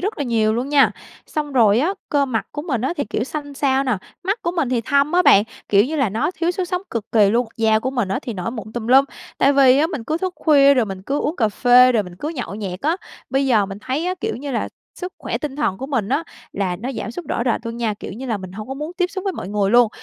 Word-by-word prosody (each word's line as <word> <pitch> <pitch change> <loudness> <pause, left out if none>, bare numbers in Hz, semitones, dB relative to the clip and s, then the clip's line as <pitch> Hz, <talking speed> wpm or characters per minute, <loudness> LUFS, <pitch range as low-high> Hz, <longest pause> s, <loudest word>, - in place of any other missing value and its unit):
rất 405 +1 -3
là 285 - -1
nhiều 220 -2 +1
luôn 250 +4 -2
nha. 285 -1 +5 0.4
Xong 295 -2 -3
rồi 225 -5 +4
á, 335 +9 +1
cơ 285 -1 +2
mặt 230 -4 -2
của 295 - -4
mình 265 -9 -2
á 265 +7 0
thì, 285 - -1
kiểu, 225 - -1
xanh 285 0 -6
xao 270 -1 +1
nè, 250 -5 +1 0.3
mắt 400 +5 -2
của 340 - 0
mình 290 -7 +1
thì 245 -2 +1
thâm 280 +5 +1
á 360 - +4
bạn, 200 - +7 0.3
kiểu 200 0 +5
như 310 +5 -3
là, 270 -6 +2
nó 230 - -1
thiếu 335 -1 -1
sức 365 +1 -2
sống 360 0 -2
cực 225 -3 -3
kì 205 -3 +5
luôn. 240 +2 +1
Da 220 -1 +3
của 255 +4 -2
mình 240 -7 -1
á 195 - -1
thì 240 - -4
nổi 185 +3 -3
mụn 220 -3 -7
tùm 235 -1 -4
lum, 265 +3 +6 0.3
tại 275 - +4
vì 270 -1 +6
á 310 - +3
mình 295 -10 -5
cứ 315 +5 -1
thức 370 0 -2
khuya 280 -3 +5
rồi 250 - +3
mình 195 -2 -7
cứ 280 +8 -1
uống 310 +4 -2
cà 220 -4 +2
phê 250 +3 +5
rồi 220 - +2
mình 180 -2 -11
cứ 290 - -4
nhậu 255 -10 -5
nhẹt 195 -3 -5
á. 315 +4 +1 0.3
Bây 270 +1 +1
giờ 220 -6 +3
mình 195 0 -7
thấy 285 +9 -2
á, 365 - 0
kiểu 440 - -2
như 280 +3 -6
là, 240 - -1 0.3
sức 365 0 -6
khỏe - - -3
tinh 290 -3 -5
thần 195 -11 -1
của 265 - -5
mình 245 -8 -1
á 285 +6 0 0.3
là 190 -3 -1
nó 245 +8 -5
giảm - - -5
sút 340 +8 -7
rõ 235 - -1
rệt 240 - +1
luôn 230 0 -5
nha, 230 -3 -1
kiểu 200 - -8
như 255 +6 -7
là, 225 -4 -1
mình 185 -1 -9
hông 215 +4 -8
có 270 - -4
muốn 300 +5 -5
tiếp 360 - +3
xúc 385 0 -5
với 390 - 0
mọi 190 - -6
người 205 -1 0
luôn. 240 0 +6
255 Hz, 295 wpm, -21 LUFS, 220-295 Hz, 0.4 s, bạn